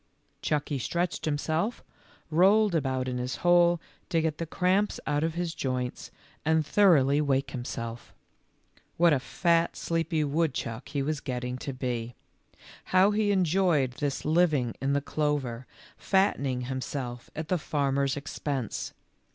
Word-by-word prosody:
Chucky 145 Hz, -2 st, -1 dB
stretched 170 Hz, +6 st, -2 dB
himself, 160 Hz, +8 st, -1 dB, 0.5 s
rolled 195 Hz, +5 st, +5 dB
about 130 Hz, -5 st, 0 dB
in 125 Hz, -1 st, -2 dB
his 125 Hz, +1 st, -3 dB
hole, 175 Hz, -1 st, +5 dB, 0.3 s
to 165 Hz, -, +2 dB
get 160 Hz, -1 st, -1 dB
the 165 Hz, -, -3 dB
cramps 190 Hz, +5 st, +1 dB
out 145 Hz, 0 st, 0 dB
of 165 Hz, 0 st, -1 dB
his 175 Hz, -1 st, -2 dB
joints, 125 Hz, -3 st, -3 dB, 0.3 s
and 160 Hz, -1 st, +2 dB
thoroughly 150 Hz, -6 st, +4 dB
wake 135 Hz, -2 st, 0 dB
himself. 120 Hz, -2 st, -6 dB, 0.9 s
What 170 Hz, -1 st, +5 dB
a 140 Hz, -, +2 dB
fat, 170 Hz, +4 st, +1 dB
sleepy 165 Hz, -1 st, -1 dB
woodchuck 140 Hz, -5 st, -2 dB
he 140 Hz, -1 st, -1 dB
was 150 Hz, +1 st, -1 dB
getting 125 Hz, -1 st, -4 dB
to 140 Hz, -, -4 dB
be! 125 Hz, -3 st, -4 dB, 0.7 s
How 190 Hz, +2 st, +4 dB
he 210 Hz, 0 st, +1 dB
enjoyed 175 Hz, -7 st, +2 dB
this 145 Hz, -2 st, -2 dB
living 155 Hz, -7 st, +2 dB
in 135 Hz, +1 st, +1 dB
the 140 Hz, -, +1 dB
clover, 140 Hz, -5 st, -2 dB, 0.3 s
fattening 140 Hz, -10 st, +1 dB
himself 125 Hz, -1 st, -5 dB
at 160 Hz, 0 st, -5 dB
the 180 Hz, -, +1 dB
farmer's 140 Hz, -3 st, 0 dB
expense 140 Hz, -4 st, -4 dB
150 Hz, 135 wpm, -28 LUFS, 130-170 Hz, 0.9 s, rolled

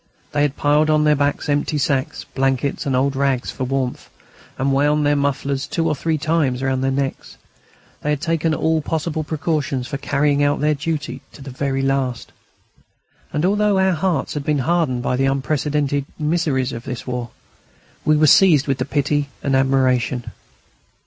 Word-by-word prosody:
They 145 Hz, -, 0 dB
had 145 Hz, -1 st, +1 dB
piled 150 Hz, +1 st, +3 dB
on 155 Hz, 0 st, +3 dB
their 150 Hz, 0 st, +4 dB
backs 145 Hz, 0 st, 0 dB
empty 145 Hz, +1 st, 0 dB
sacks, 140 Hz, -4 st, -1 dB
blankets, 135 Hz, +1 st, -1 dB
and 135 Hz, -, +1 dB
old 135 Hz, +2 st, +1 dB
rags, 135 Hz, -2 st, 0 dB
for 130 Hz, -, -4 dB
warmth, 130 Hz, -1 st, -3 dB, 0.5 s
and 135 Hz, +1 st, +1 dB
wound 145 Hz, +2 st, +2 dB
their 145 Hz, 0 st, +3 dB
mufflers 140 Hz, -1 st, -1 dB
two 165 Hz, -1 st, -1 dB
or 155 Hz, -, +2 dB
three 160 Hz, +2 st, -1 dB
times 150 Hz, -5 st, 0 dB
round 130 Hz, 0 st, 0 dB
their 135 Hz, -, +2 dB
necks; 135 Hz, 0 st, -3 dB, 0.6 s
they 150 Hz, -, -2 dB
had 150 Hz, -2 st, +1 dB
taken 165 Hz, 0 st, 0 dB
all 160 Hz, 0 st, +1 dB
possible 160 Hz, +1 st, -2 dB
precautions 150 Hz, -4 st, -2 dB
for 140 Hz, -1 st, -4 dB
carrying 145 Hz, +1 st, +1 dB
out 145 Hz, 0 st, +2 dB
their 150 Hz, +1 st, +2 dB
duty 150 Hz, 0 st, -3 dB
to 140 Hz, -, -12 dB
the 135 Hz, -, -8 dB
very 135 Hz, +1 st, -2 dB
last. 135 Hz, -3 st, -1 dB, 1.0 s
And 150 Hz, +3 st, 0 dB
although 205 Hz, +1 st, +2 dB
our 190 Hz, 0 st, +3 dB
hearts 175 Hz, +1 st, -1 dB
had 150 Hz, -, -3 dB
been 150 Hz, 0 st, +1 dB
hardened 160 Hz, -8 st, +1 dB
by 125 Hz, -, 0 dB
the 135 Hz, +1 st, +2 dB
unprecedented 145 Hz, +1 st, 0 dB
miseries 150 Hz, -5 st, 0 dB
of 115 Hz, -, -6 dB
this 125 Hz, -2 st, -5 dB
war, 125 Hz, -2 st, -4 dB, 0.7 s
we 155 Hz, 0 st, +3 dB
were 155 Hz, -, +4 dB
seized 155 Hz, -3 st, +6 dB
with 135 Hz, -2 st, -1 dB
pity 145 Hz, 0 st, 0 dB
and 135 Hz, -1 st, +1 dB
admiration. 130 Hz, -2 st, +1 dB
145 Hz, 175 wpm, -20 LUFS, 135-155 Hz, 1.0 s, seized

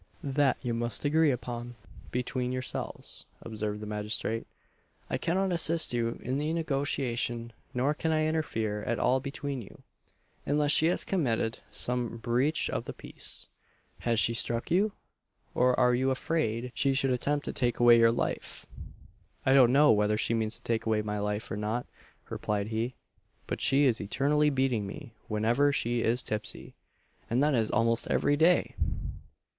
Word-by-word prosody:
"That 140 Hz, -1 st, +2 dB
you 120 Hz, -2 st, -1 dB
must 120 Hz, +4 st, -2 dB
agree 155 Hz, +1 st, +4 dB
upon 120 Hz, -1 st, -4 dB, 0.3 s
between 125 Hz, 0 st, -2 dB
yourselves," 130 Hz, -1 st, -4 dB, 0.2 s
observed 105 Hz, -1 st, -4 dB
the -, -, -5 dB
magistrate 105 Hz, +2 st, -3 dB, 0.6 s
"I -, -, 0 dB
cannot 190 Hz, +3 st, 0 dB
assist 165 Hz, -4 st, +2 dB
you 115 Hz, -1 st, -1 dB
in 130 Hz, +3 st, -1 dB
the 150 Hz, +2 st, -1 dB
negotiation, 130 Hz, -6 st, -1 dB, 0.2 s
nor 135 Hz, +4 st, +2 dB
can 160 Hz, +2 st, -1 dB
I 155 Hz, 0 st, +2 dB
interfere 115 Hz, -10 st, -1 dB
at 120 Hz, +2 st, -1 dB
all 130 Hz, +1 st, +2 dB
between 140 Hz, 0 st, -4 dB
you, 100 Hz, -, -14 dB, 0.6 s
unless 145 Hz, 0 st, +2 dB
she 160 Hz, -, +5 dB
has 175 Hz, -, +1 dB
committed 115 Hz, -11 st, 0 dB
some 120 Hz, -1 st, -2 dB
breach 125 Hz, +7 st, +1 dB
of -, -, -3 dB
the -, -, -6 dB
peace -, -, -6 dB, 0.5 s
Has 115 Hz, -2 st, +1 dB
she 115 Hz, -, +3 dB
struck 115 Hz, 0 st, 0 dB
you? 200 Hz, +4 st, +3 dB, 0.6 s
or 125 Hz, 0 st, +3 dB
are 125 Hz, -1 st, +4 dB
you 130 Hz, +2 st, +2 dB
afraid 125 Hz, -4 st, -1 dB
she 135 Hz, -1 st, +1 dB
should 135 Hz, -1 st, +2 dB
attempt 145 Hz, +4 st, 0 dB
to -, -, -3 dB
take 120 Hz, -2 st, 0 dB
away 120 Hz, -1 st, +7 dB
your 115 Hz, 0 st, +6 dB
life?" 115 Hz, -, -3 dB, 0.8 s
"I 130 Hz, -, +4 dB
don't 130 Hz, -3 st, +7 dB
know 145 Hz, +3 st, +6 dB
whether 105 Hz, 0 st, +2 dB
she 115 Hz, -, +1 dB
means 110 Hz, 0 st, 0 dB
to 115 Hz, -, -12 dB
take 115 Hz, -1 st, -1 dB
away 110 Hz, -1 st, +1 dB
my 105 Hz, 0 st, -3 dB
life, 105 Hz, +1 st, -3 dB
or 110 Hz, -, -2 dB
not," 110 Hz, +4 st, -2 dB, 0.4 s
replied 105 Hz, 0 st, -2 dB
he, 115 Hz, +3 st, -2 dB, 0.5 s
"but -, -, -4 dB
she 140 Hz, +2 st, +4 dB
is 120 Hz, -4 st, +2 dB
eternally 145 Hz, +8 st, +2 dB
beating 130 Hz, -7 st, 0 dB
me 110 Hz, +3 st, -9 dB
whenever 115 Hz, +7 st, +2 dB
she 120 Hz, -4 st, 0 dB
is 120 Hz, +3 st, +1 dB
tipsy; 110 Hz, -1 st, -5 dB, 0.6 s
and 125 Hz, +4 st, +2 dB
that 150 Hz, 0 st, +3 dB
is 115 Hz, -4 st, +1 dB
almost 115 Hz, +1 st, +1 dB
every 145 Hz, +1 st, +2 dB
day!" 165 Hz, +4 st, +3 dB
125 Hz, 165 wpm, -29 LUFS, 115-145 Hz, 0.8 s, away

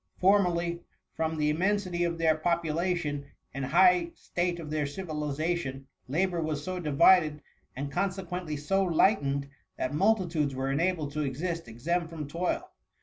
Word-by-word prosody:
Formerly, 175 Hz, -3 st, +2 dB, 0.3 s
from 160 Hz, 0 st, -1 dB
the 150 Hz, 0 st, +2 dB
immensity 185 Hz, +1 st, 0 dB
of 170 Hz, -1 st, -2 dB
their 160 Hz, -1 st, +3 dB
popu 165 Hz, 0 st, 0 dB
lation, 165 Hz, -4 st, -1 dB, 0.3 s
and 135 Hz, -1 st, -3 dB
high 175 Hz, +4 st, +5 dB
state 175 Hz, 0 st, -2 dB
of 155 Hz, -2 st, -7 dB
their 150 Hz, -2 st, 0 dB
civilization, 150 Hz, -3 st, -3 dB, 0.2 s
la 160 Hz, +9 st, +2 dB
bour 175 Hz, -3 st, -2 dB
was 155 Hz, -2 st, -2 dB
so 185 Hz, +1 st, -3 dB
divided, 155 Hz, -1 st, +4 dB, 0.3 s
and 140 Hz, +2 st, -4 dB
consequently 180 Hz, -2 st, -2 dB
so 195 Hz, +7 st, +1 dB
light 190 Hz, +3 st, +3 dB
ened, 140 Hz, 0 st, -2 dB, 0.3 s
that 130 Hz, -, -2 dB
multitudes 170 Hz, -6 st, +1 dB
were 135 Hz, +1 st, -1 dB
enabled 160 Hz, 0 st, 0 dB
to 150 Hz, +1 st, -2 dB
exist 165 Hz, +4 st, -3 dB
exempt 160 Hz, +9 st, -2 dB
from 155 Hz, -3 st, -6 dB
toil. 170 Hz, +5 st, -2 dB
165 Hz, 150 wpm, -29 LUFS, 150-180 Hz, 0.3 s, high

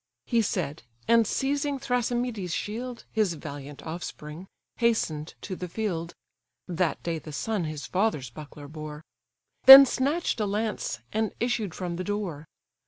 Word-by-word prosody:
He 235 Hz, -1 st, +2 dB
said: 175 Hz, -8 st, -2 dB, 0.3 s
and, 230 Hz, -2 st, +5 dB
seizing 280 Hz, +3 st, 0 dB
Thrasymedes' 245 Hz, -7 st, -1 dB
shield, 235 Hz, +3 st, -5 dB
(His 210 Hz, -6 st, +1 dB
valiant 145 Hz, -1 st, -8 dB
offspring,) 160 Hz, +1 st, -7 dB, 0.3 s
hasten'd 170 Hz, -10 st, 0 dB
to 190 Hz, -, -5 dB
the 180 Hz, -, -5 dB
field; 170 Hz, -4 st, -3 dB, 0.5 s
(That 180 Hz, -2 st, -1 dB
day 165 Hz, -1 st, -2 dB
the 155 Hz, -, -10 dB
son 205 Hz, +4 st, -2 dB
his 155 Hz, -2 st, -5 dB
father's 180 Hz, -, 0 dB
buckler 145 Hz, +1 st, -10 dB
bore;) 155 Hz, 0 st, -8 dB, 0.6 s
Then 270 Hz, +2 st, +13 dB
snatch'd 275 Hz, +4 st, 0 dB
a 210 Hz, -, 0 dB
lance, 205 Hz, -, -2 dB
and 220 Hz, 0 st, -1 dB
issued 225 Hz, -7 st, -1 dB
from 175 Hz, -2 st, -4 dB
the 185 Hz, -, -3 dB
door. 185 Hz, -7 st, -4 dB
190 Hz, 140 wpm, -27 LUFS, 155-230 Hz, 0.6 s, Then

